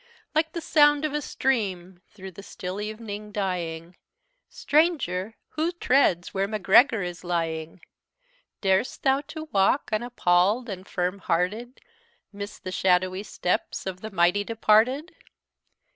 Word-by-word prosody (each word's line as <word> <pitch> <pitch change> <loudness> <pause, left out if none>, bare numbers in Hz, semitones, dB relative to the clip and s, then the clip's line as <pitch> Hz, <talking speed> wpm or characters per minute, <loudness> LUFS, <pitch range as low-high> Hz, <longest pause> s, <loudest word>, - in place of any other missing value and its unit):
"Like 315 +1 +1
the 335 - -4
sound 295 -1 +4
of 300 - -2
a 295 - -1
stream 190 -11 -2
through 190 -2 -10
the 185 - -11
still 190 0 -6
evening 210 -1 -6
dying, 175 -4 -3 0.5
Stranger! 245 - 0
who 320 +3 -1
treads 255 - +2
where 195 0 0
Macgregor 215 +3 +4
is 175 0 -6
lying? 165 -1 -3 0.8
Darest 190 +4 +1
thou 270 0 +3
to 315 -1 -7
walk, 195 +8 +2
unappall'd 215 0 +1
and 190 -1 -7
firm 180 +1 -2
hearted, 210 +10 -2 0.5
'Mid 200 0 -5
the 185 - -5
shadowy 185 0 +1
steps 180 -3 -2
of 185 -1 -5
the 220 - -6
mighty 185 +1 +2
departed? 230 - +2
200 Hz, 130 wpm, -25 LUFS, 180-245 Hz, 0.8 s, sound